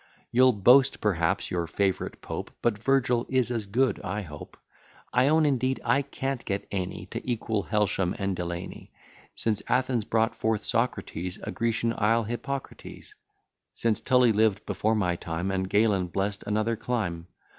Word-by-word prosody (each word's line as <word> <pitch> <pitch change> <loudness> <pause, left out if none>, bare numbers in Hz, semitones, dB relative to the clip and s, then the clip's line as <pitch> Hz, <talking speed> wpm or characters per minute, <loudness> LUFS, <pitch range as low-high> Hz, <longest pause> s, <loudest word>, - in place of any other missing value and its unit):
You'll 130 +1 +5
boast, 125 +7 +5
perhaps, 85 -6 0
your 85 -2 -1
favourite 95 +4 -1
Pope; - - -5
But 110 -3 +1
Virgil 125 -1 +1
is 130 -2 +1
as 115 -4 -2
good, 125 +6 +1
I 105 0 -3
hope. 75 -4 -10 0.6
I 125 +2 +4
own 155 +1 +4
indeed 130 -2 +1
I 135 +4 +3
can't 135 -2 -4
get 100 0 -3
any 95 -3 -3
To - - -4
equal 110 -4 -2
Helsham 105 -4 0
and 100 -1 -1
Delany; 85 0 -6 0.4
Since 110 -2 0
Athens 125 -2 +1
brought 115 +1 +1
forth 110 -1 -1
Socrates, 95 -7 -1
A - - -4
Grecian 115 0 0
isle, 115 +2 +3
Hippocrates; 130 +5 -6 0.6
Since 115 -2 +1
Tully 125 -3 +4
lived 110 -1 +2
before 110 +1 0
my 90 -5 +1
time, 85 +3 -3
And 95 -1 -1
Galen 100 -3 +2
bless'd 100 +3 -2
another 110 +2 +1
clime. 95 -9 -3
110 Hz, 155 wpm, -27 LUFS, 95-125 Hz, 0.6 s, You'll